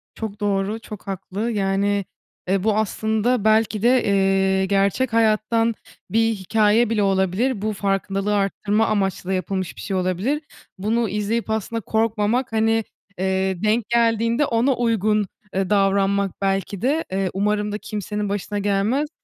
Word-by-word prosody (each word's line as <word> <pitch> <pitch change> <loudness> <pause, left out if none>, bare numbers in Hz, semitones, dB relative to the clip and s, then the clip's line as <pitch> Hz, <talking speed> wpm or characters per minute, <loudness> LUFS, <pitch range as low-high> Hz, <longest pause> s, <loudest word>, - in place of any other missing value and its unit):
Çok 220 -2 -6
doğru, 205 +1 -1
çok 210 -3 -10
haklı. 195 +4 -3
Yani, 200 -1 0 0.4
eee, 190 0 +1
bu 215 -1 +2
aslında 220 +2 0
belki 220 -1 +3
de, 245 +2 +4
eee, 195 -1 +2
gerçek 200 +5 +1
hayattan 225 +1 +2 0.3
bir 225 +1 +2
hikâye 215 +3 +2
bile 220 -2 +1
olabilir. 195 +5 +1
Bu 215 +1 -1
farkındalığı 195 +1 -1
arttırma 205 +2 +1
amaçlı 195 -3 -1
da - - +1
yapılmış 185 -1 -2
bir - - -9
şey 195 - -3
olabilir. 185 - -1 0.4
Bunu 220 +3 0
izleyip 210 +3 -2
aslında 220 +1 -2
korkmamak, 220 +3 0
hani, 225 0 +2 0.3
eee, 190 -1 -1
denk 215 +1 +1
geldiğinde 230 +2 +2
ona 245 +2 +2
uygun, 215 -3 +1 0.3
eee, 190 0 -1
davranmak 200 -1 +2
belki 195 0 -1
de, 290 +6 +1
eee, 190 0 0
umarım 210 +1 0
da 210 - -2
kimsenin 210 -1 -4
başına 205 +1 -3
gelmez. 205 +9 0
210 Hz, 145 wpm, -22 LUFS, 195-225 Hz, 0.4 s, de